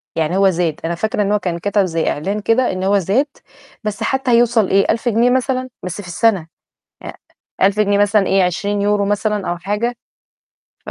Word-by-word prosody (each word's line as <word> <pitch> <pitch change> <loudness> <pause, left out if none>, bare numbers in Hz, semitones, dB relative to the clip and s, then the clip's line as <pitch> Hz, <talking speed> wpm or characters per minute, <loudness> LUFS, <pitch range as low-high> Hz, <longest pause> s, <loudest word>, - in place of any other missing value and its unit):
يعني 165 +3 0
هو 195 -1 +4
زاد، 170 -3 -1
أنا 170 +1 -1
فاكرة 215 +3 -1
إن 200 0 0
هو 210 - +2
كان 175 -2 -3
كَتَب 205 +1 +1
زي 165 -2 -1
إعلان 195 +8 -2
كده 245 +4 +2
إن 185 0 -4
هو 200 +1 +3
زاد، 205 - +1 0.6
بس 210 -1 -3
حتى 265 -2 0
هيوصل 235 -3 +3
إيه؟ 195 +1 +3
1.000 230 +2 -1
جنيه 235 +3 +3
مثلًا؟ 255 0 0
بس 185 +3 -5
في 180 - -12
السنة، 185 -2 +1 0.6
أ - - -7 0.5
1000 200 +2 +3
جنيه 205 -1 +2
مثلًا 205 -1 +3
إيه؟ 195 -1 +3
20€ 200 +3 0
مثلًا 205 0 -1
أو 175 - -2
حاجة، 210 +7 -2 0.9
ف - - -6
205 Hz, 195 wpm, -18 LUFS, 185-225 Hz, 0.9 s, هو